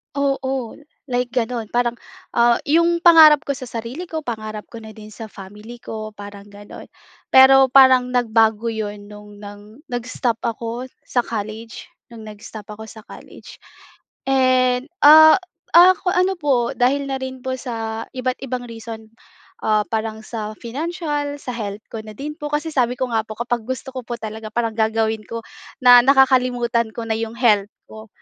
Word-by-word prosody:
Oo. 270 -3 -2 0.3
Like 250 -2 -1
gano'n. 235 -2 -2
Parang, 240 -1 -1 0.3
ah, 235 0 +4
'yong 335 +3 +2
pangarap 315 -3 +7
ko - - -1
sa 265 -2 -6
sarili 240 +10 -7
ko, 320 -2 -5
pangarap 215 -4 -6
ko 230 - -8
na 220 -1 -12
din 215 -1 -12
sa 220 +1 -9
family 210 +4 -12
ko, 215 -2 -8
parang 205 0 -11
gano'n. 205 0 -12 0.4
Pero 265 0 +7
parang 260 -1 +5
nagbago 225 -2 +1
'yon 210 -2 -6
no'ng 210 0 -13
nang 205 0 -11 0.3
nag-stop 240 -1 -2
ako 235 +2 -4 0.2
sa 245 - -1
college, 220 0 -7 0.2
no'ng 230 -2 -12
nag-stop 210 0 -10
ako 220 +1 -10
sa 220 0 -13
college. - - -14 0.7
And, 255 0 +2 0.2
ah, 315 +1 +9 0.4
ak 365 +2 +7
ano 365 +1 +1
po 265 -6 +1
dahil 270 +3 +1
na 270 - -3
rin 260 -1 -7
po 260 - -3
sa 225 -3 -5
iba't 255 0 -3
ibang 255 -1 -4
reason. 225 -1 -10 0.5
Ah, 215 -1 +2
parang 220 0 -4
sa 215 -3 -6
financial, 295 +2 -4
sa 255 - -6
health 210 -1 -6
ko 225 - -6
na 215 0 -11
din 300 +4 -6
po. 295 - -4
Kasi 300 +2 -2
sabi 250 -3 +1
ko 255 - 0
nga 225 -1 0
po 215 - -8
kapag 235 -1 -2
gusto 260 +1 -5
ko 255 - -3
po 240 0 -5
talaga, 220 0 -7
parang 230 -1 -1
gagawin 220 0 0
ko 230 0 -6 0.4
na 245 -1 +9
nakakalimutan 250 -4 +2
ko 230 - -5
na 220 - -1
'yong 225 0 -5
health 210 -5 +2 0.2
ko 220 0 -12
235 Hz, 165 wpm, -20 LUFS, 220-260 Hz, 0.7 s, ah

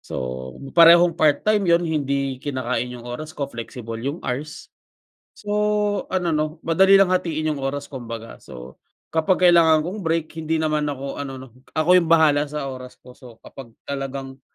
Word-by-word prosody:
So - - -8 0.6
parehong 170 +1 +7
part 155 -3 +2
time 210 -4 +2
‘yon, 170 +1 +4
hindi 140 -4 -2
kinakain 125 -3 -3
yung 120 - -12
oras 155 +6 -7
ko, 145 - -1
flexible 115 -2 -7
yung 140 +7 -5
hours. 140 +5 -5 0.7
So 210 0 -1
ano 180 -3 -1
'no, 155 +1 -2
madali 190 +4 +5
lang 190 -2 +4
hatiin 155 -3 -1
yung 140 - -7
oras 140 +1 -3
kumbaga, 115 -4 -9
so 65 0 -12 0.3
kapag 180 +3 +2
kailangan 160 -2 +4
kong 195 +3 -5
break 165 0 0 0.2
hindi 160 +1 -1
naman 150 -1 0
ako 140 0 -5
ano 135 -2 -6
‘no, 130 - -10 0.3
ako 155 +2 +1
yung 165 - -4
bahala 150 -3 +4
sa 150 -2 -4
oras 130 -1 -8
ko. 125 - -16
So 120 -3 -15
kapag 135 -3 -11 0.2
talagang, 135 -1 -6
150 Hz, 170 wpm, -22 LUFS, 135-165 Hz, 0.7 s, parehong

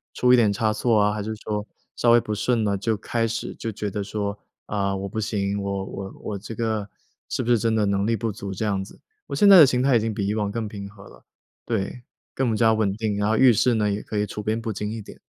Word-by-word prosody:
出 125 0 +4
一 - - +9
点 115 -4 +4
差 110 +1 0
错 110 0 +2
啊， 105 0 +3
还 105 - -3
是 110 +2 -4
说 105 0 -4 0.3
稍 120 - +2
微 120 - +7
不 110 - -4
顺 115 +2 +1
了， 100 -1 +1
就 110 +3 -1
开 115 +3 -1
始 115 +1 -4
就 115 - -5
觉 105 -1 -4
得 100 +1 -3
说： 100 0 -3 0.3
“啊， 100 -1 -1
我 95 0 -4
不 105 +3 -4
行。 100 -1 -1
我 100 -1 -3
我 95 0 -7
我 100 - -4
这 110 +3 -8
个 110 -3 -2 0.4
是 - - -1
不 120 - 0
是 120 - +4
真 115 +1 +1
的 110 -1 +2
能 100 0 0
力 115 - +2
不 115 -1 -2
足 100 -1 -7
这 95 +3 -3
样 100 -2 0
子？ 95 - -14 0.3
“我 - - -4
现 205 - +4
在 195 -2 +10
的 150 - +9
心 125 0 +1
态 135 -2 +4
已 115 - +5
经 110 +1 -1
比 100 - -1
以 100 - 0
往 105 -2 -1
更 110 0 -3
平 100 -1 -7
和 100 -1 -15
了。 - - -17 0.4
对， 115 +1 -3 0.3
更 120 -4 0
加 110 0 +4
稳 110 -3 +1
定， 105 -2 -2
然 105 +1 +1
后 110 - +2
遇 130 -2 +6
事 120 +3 +3
呢， 105 -2 +1
也 100 +1 -2
可 105 - -5
以 105 - +1
处 105 - -6
变 110 +2 -1
不 115 -2 -4
惊 105 +2 -4
一 115 - -5
点。 105 - -12
105 Hz, 300 characters per minute, -24 LUFS, 100-115 Hz, 0.4 s, 在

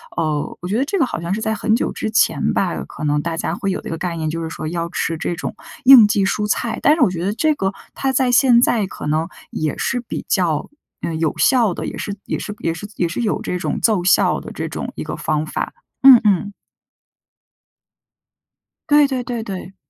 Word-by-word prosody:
呃， 155 -2 -2
我 180 - -5
觉 205 - 0
得 265 - +1
这 395 +6 -1
个 270 - +4
好 240 - -4
像 170 +3 -3
是 215 - -3
在 220 0 0
很 220 0 +1
久 - - -1
之 - - -3
前 215 - +2
吧， - - -1
可 - - -9
能 150 0 +1
大 165 +1 -3
家 - - -2
会 205 -3 -2
有 - - -3
这 - - -8
个 165 - -3
概 175 -1 -3
念， 155 -2 -2
就 165 +1 -3
是 160 - -4
说 155 - -6
要 170 0 -2
吃 165 -1 -2
这 170 - -3
种” 180 - -5 0.3
应 250 -5 +9
季 205 -1 +1
蔬 210 +2 0
菜“。 230 +2 -1
但 295 - +6
是 320 - -3
我 245 - +5
觉 175 -1 -4
得 200 - 0
这 305 +8 +2
个 195 -5 -1 0.2
它 270 -1 -1
在 260 -1 +2
现 245 -1 +5
在 220 -5 +2
可 - - -7
能， 155 +2 0 0.2
也 155 -1 -2
是 250 - -1
比 235 - -6
较， 165 -6 0 0.3
嗯， 160 -1 -3
有 160 -2 -1
效 235 -8 +3
的， - - -5
也 - - -5
是 200 - -4
也 - - -2
是 210 - -5
也 165 - -1
是 185 +5 -8
也 175 - 0
是 170 +8 -4
有 220 -3 -1
这 180 - -3
种 - - -2
奏 210 -6 +2
效 185 - +3
的 - - -9
这 - - -4
种 - - -5
一 - - -5
个 - - -5
方 155 0 -1
法。 - - -4 0.3
嗯 265 -3 +10
嗯。 205 0 +2 2.4
对 295 0 +6
对 260 -2 -2
对 235 -2 -4
对。 190 -2 -7
195 Hz, 250 characters per minute, -19 LUFS, 165-235 Hz, 2.4 s, 嗯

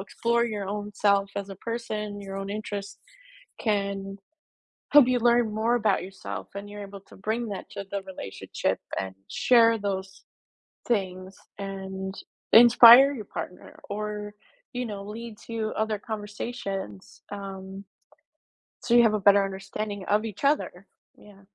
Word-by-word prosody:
explore 235 +4 0
your 210 -4 -3
own 205 0 -4
self 200 -1 +2
as 200 0 -3
a 195 - -8
person, 210 -2 -4
your 195 -1 -7
own 195 0 -5
interest 205 -1 -5 0.6
can 200 -2 -2 0.7
help 290 -4 +8
you 250 -1 +2
learn 235 -2 +3
more 225 +3 +1
about 210 -6 +1
yourself 100 - -7
and 200 +1 -6
you're 205 0 -7
able 195 0 -11
to - - -17
bring 220 +4 -2
that 200 - -6
to 200 -1 -6
the 200 0 -2
relationship 185 - -4 0.2
and 95 -1 -5
share 230 -2 +4
those 195 -2 -4 0.7
things 190 -4 -2 0.2
and 190 -1 -5 0.4
inspire 240 +3 +9
your 215 -6 -7
partner 180 - -8
or 210 0 -4 0.4
you 250 0 -2
know, 200 -3 -6
lead 220 +2 -8
to 225 -2 -2
other 220 -1 0
conversations, 205 - -6
um 195 -1 -7 1.0
so 240 - 0
you 240 - +8
have 220 -2 +4
a - - 0
better 200 0 +7
understanding 195 +1 -5
of 210 +2 +2
each 220 +2 -7
other, 275 -10 0 0.3
yeah. 200 -1 -17
205 Hz, 145 wpm, -26 LUFS, 195-225 Hz, 1.0 s, inspire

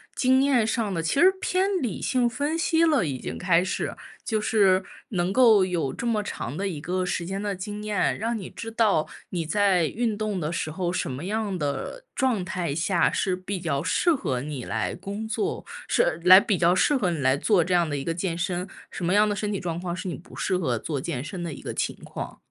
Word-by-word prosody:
经 260 +1 +4
验 265 -5 +3
上 220 -2 -1
的， 165 -3 -2
其 165 +12 0
实 370 +2 +8
偏 375 +2 +1
理 225 -7 -3
性 250 -2 +2
分 285 +7 -1
析 330 0 +2
了， 300 - +3
已 135 -4 -3
经 - - -5
开 180 -2 +3
始。 185 - -3 0.3
就 220 -2 0
是 195 -3 +3 0.3
能 180 -1 -1
够 220 -6 +6
有 170 -7 -1
这 235 - -4
么 215 -3 +1
长 125 -8 -5
的 195 +4 -2
一 160 -5 -5
个 185 +4 -2
时 180 -1 -2
间 195 +3 -4
的 205 -1 -1
经 205 +3 -6
验， 210 -2 0
让 230 +1 -2
你 190 - -7
知 225 0 -7
道 215 -8 +2 0.3
你 170 -3 -2
在 195 -1 +3
运 225 +4 -1
动 210 -3 -2
的 150 -2 -2
时 155 -2 -2
候， 175 +1 -2
什 140 - -2
么 135 +6 -5
样 210 -1 -2
的 145 - -3
状 245 -8 +1
态 180 -5 -2
下 170 +3 +2
是 185 -3 0
比 185 +1 -5
较 155 -4 -1
适 340 - +2
合 135 - -2
你 140 -1 -5
来 110 -2 -2
工 200 +4 -5
作 395 - -2 0.2
是 - - +2
来 185 +1 +10
比 205 -2 0
较 175 +1 +4
适 290 +10 +3
合 205 -9 +1
你 170 - -2
来 130 -2 +3
做 175 +3 +2
这 185 - 0
样 175 -2 +3
的 145 - -2
一 135 - -4
个 165 - 0
健 170 0 -2
身， 180 +1 -2 0.2
什 175 - -5
么 180 - +2
样 210 +1 +5
的 205 - 0
身 205 +1 -2
体 200 - -2
状 170 -2 -3
况 175 -1 -3
是 185 +2 -5
你 175 - -3
不 170 - -15
适 185 - 0
合 125 -10 -1
做 145 +1 -3
健 140 -5 -3
身 175 +4 -6
的 170 - -4
一 - - -10
个 - - -5
情 - - -1
况。 - - -7
185 Hz, 255 characters per minute, -25 LUFS, 170-220 Hz, 0.3 s, 来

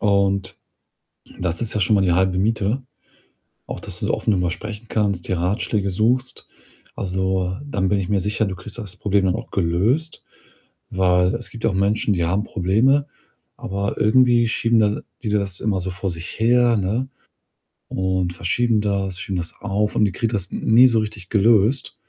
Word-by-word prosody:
und 100 -2 +1 0.8
das 85 -2 0
ist 115 - -1
ja 105 - -1
schon 105 +4 +3
mal 100 - +3
die 90 -2 +2
halbe 95 +1 +2
Miete. 110 +5 0 0.9
Auch - - -6
dass - - -7
du - - -1
so - - +1
offen - - -1
drüber 90 -3 +1
sprechen 105 +5 -7
kannst, 100 -5 -1
dir 95 - 0
Ratschläge 100 +2 -1
suchst. 120 +7 0 0.5
Also, 95 0 -1
dann 100 -10 -1
bin 100 - +2
ich 90 - -4
mir 100 -1 +1
sicher, 105 +3 0
du 95 -1 -4
kriegst 105 +5 -9
das 105 -3 -6
Problem 100 -1 +1
dann 90 - +1
auch - - -8
gelöst, 100 - 0 0.7
weil 90 0 +2
es 120 - -9
gibt 115 - -4
auch 100 - +1
Menschen, 100 +2 +1
die 85 -2 0
haben 95 +5 0
Probleme, 115 +11 +2 0.5
aber 100 +1 -3
irgendwie 120 +1 +4
schieben 115 0 +2
de 105 0 +1 0.2
die 115 - -3
das 100 -3 0
immer 100 -4 0
so 95 +1 -3
vor 90 +2 -3
sich 85 +4 -8
her, 120 +1 +4
ne? 110 +7 -1 0.8
Und 95 -1 -1
verschieben 110 +5 +1
das, 95 -3 -2
schieben 95 0 -3
das 85 -1 -5
auf 105 +1 -1
und 105 - +4
die 100 - 0
kriegen 115 +4 -1
das 95 -4 -2
n - - -4
nie 125 +3 +8
so 115 -3 +2
richtig 105 -4 -5
gelöst. 110 +4 +3
100 Hz, 185 wpm, -21 LUFS, 95-110 Hz, 0.9 s, nie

